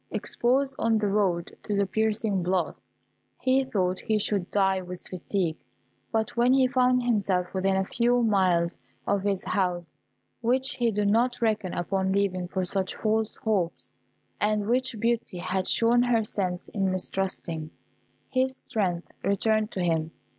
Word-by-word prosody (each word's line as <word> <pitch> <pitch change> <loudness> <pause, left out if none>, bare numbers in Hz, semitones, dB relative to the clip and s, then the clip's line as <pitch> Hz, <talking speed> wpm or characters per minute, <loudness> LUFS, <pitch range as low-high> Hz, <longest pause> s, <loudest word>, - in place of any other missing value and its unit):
Exposed 265 +3 +1
on 225 -1 +2
the 210 -1 0
road 190 -4 0
to 210 - -2
the 200 - +3
piercing 215 -1 0
blasts, 180 -1 -1 0.6
he 260 +1 +3
thought 185 -8 -1
he 220 -1 0
should 200 -3 -1
die 190 -2 +2
with 180 0 -6
fatigue; 180 -2 -2 0.5
but 220 -1 -1
when 240 +2 +4
he 265 -1 +5
found 250 -1 +3
himself 195 -6 +1
within 190 0 +1
a 190 - +1
few 240 +3 +2
miles 180 -5 +2 0.3
of 200 -1 +1
his 195 -1 -1
house 175 -4 -1 0.5
(which 260 +4 +1
he 240 -2 +2
did 210 -1 0
not 240 +4 +2
reckon 215 -5 0
upon 190 +2 0
leaving 190 -2 0
for 185 0 -2
such 190 +1 -1
false 220 0 0
hopes, 195 -6 -1 0.5
and 210 0 +1
which 250 -1 0
Beauty 230 -4 -1
had 185 +1 -2
shown 235 +1 +4
her 240 -2 +2
sense 185 -4 -3
in 195 -2 0
mistrusting) 185 -4 -3 0.6
his 260 0 0
strength 180 -5 -2 0.2
returned 215 +2 +2
to 185 - -4
him. 160 -2 0
200 Hz, 155 wpm, -27 LUFS, 185-230 Hz, 0.6 s, he